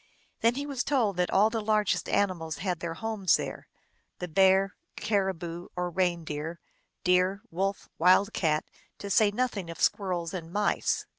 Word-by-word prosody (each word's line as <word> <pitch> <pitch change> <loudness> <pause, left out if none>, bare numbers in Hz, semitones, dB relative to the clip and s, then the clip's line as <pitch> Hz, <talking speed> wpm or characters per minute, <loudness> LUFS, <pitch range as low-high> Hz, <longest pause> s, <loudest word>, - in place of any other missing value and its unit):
Then 230 +1 +3
he 280 +1 -3
was 275 -3 -2
told 230 -10 +1
that 180 0 +1
all 210 +3 +4
the 225 -1 -1
largest 210 -1 +1
animals 175 -6 0
had 180 -2 -2
their 165 -1 -4
homes 215 -3 +1
there: - - -6 0.5
the 180 - -5
bear, 190 +3 +4 0.2
caribou 180 -4 -2
or 180 0 -2
reindeer, 170 -3 -2 0.4
deer, 185 +3 +2
wolf, 195 +4 -2
wild 185 +5 +5
cat, 155 -3 +1 0.3
to 200 - -6
say 210 +2 +5
nothing 210 -5 -2
of 165 - -8
squirrels 180 -4 0
and 170 -3 -6
mice. 205 +2 0
190 Hz, 155 wpm, -28 LUFS, 170-205 Hz, 0.5 s, wild